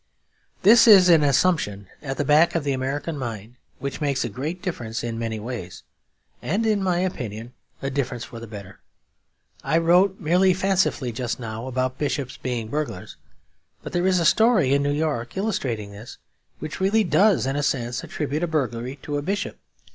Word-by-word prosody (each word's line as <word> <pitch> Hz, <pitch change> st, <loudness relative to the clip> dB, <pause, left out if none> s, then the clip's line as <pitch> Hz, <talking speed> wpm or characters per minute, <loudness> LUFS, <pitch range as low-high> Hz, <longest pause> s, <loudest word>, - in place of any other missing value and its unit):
This 225 Hz, +4 st, +7 dB
is 190 Hz, -5 st, +8 dB
an 165 Hz, -3 st, +6 dB
assumption 140 Hz, -, +1 dB, 0.2 s
at 135 Hz, -2 st, -5 dB
the 145 Hz, -, -1 dB
back 155 Hz, +5 st, +4 dB
of 165 Hz, -, 0 dB
the 140 Hz, -, 0 dB
American 140 Hz, +4 st, -3 dB
mind 115 Hz, -1 st, -6 dB, 0.2 s
which 140 Hz, +3 st, -5 dB
makes 140 Hz, -3 st, 0 dB
a -, -, -3 dB
great 145 Hz, -, -4 dB
difference 120 Hz, -, -4 dB
in 115 Hz, -1 st, -4 dB
many 115 Hz, -1 st, -3 dB
ways; 105 Hz, -6 st, -7 dB, 0.6 s
and 220 Hz, +4 st, -1 dB
in 215 Hz, -2 st, +2 dB
my 185 Hz, -2 st, +1 dB
opinion 120 Hz, -, -4 dB, 0.3 s
a 135 Hz, -, -2 dB
difference 130 Hz, -3 st, -2 dB
for 115 Hz, -, -9 dB
the 115 Hz, -, -9 dB
better. 100 Hz, -2 st, -10 dB, 0.8 s
I 165 Hz, -, +1 dB
wrote 180 Hz, +4 st, +3 dB
merely 180 Hz, +2 st, +3 dB
fancifully 185 Hz, -9 st, +1 dB
just 120 Hz, +1 st, -4 dB
now 115 Hz, +1 st, -6 dB
about 130 Hz, 0 st, -2 dB
bishops 140 Hz, -3 st, -2 dB
being 120 Hz, -3 st, -3 dB
burglars; 145 Hz, -10 st, -4 dB, 0.7 s
but -, -, -8 dB
there 175 Hz, +1 st, +1 dB
is 185 Hz, -1 st, +3 dB
a 170 Hz, -, 0 dB
story 190 Hz, -, +4 dB
in 140 Hz, -, +3 dB
New 140 Hz, -, 0 dB
York, 145 Hz, -3 st, -2 dB
illustrating 125 Hz, -, -2 dB
this, 105 Hz, +4 st, -11 dB, 0.4 s
which 155 Hz, 0 st, -7 dB
really 200 Hz, +4 st, +3 dB
does 180 Hz, 0 st, +3 dB
in 135 Hz, +1 st, -1 dB
a 145 Hz, -, 0 dB
sense 125 Hz, -3 st, -1 dB
attribute 150 Hz, +1 st, -3 dB
a 175 Hz, -, 0 dB
burglary 130 Hz, -5 st, -2 dB
to 145 Hz, -1 st, -3 dB
a -, -, -2 dB
bishop. 195 Hz, +7 st, -3 dB
140 Hz, 180 wpm, -23 LUFS, 120-175 Hz, 0.8 s, is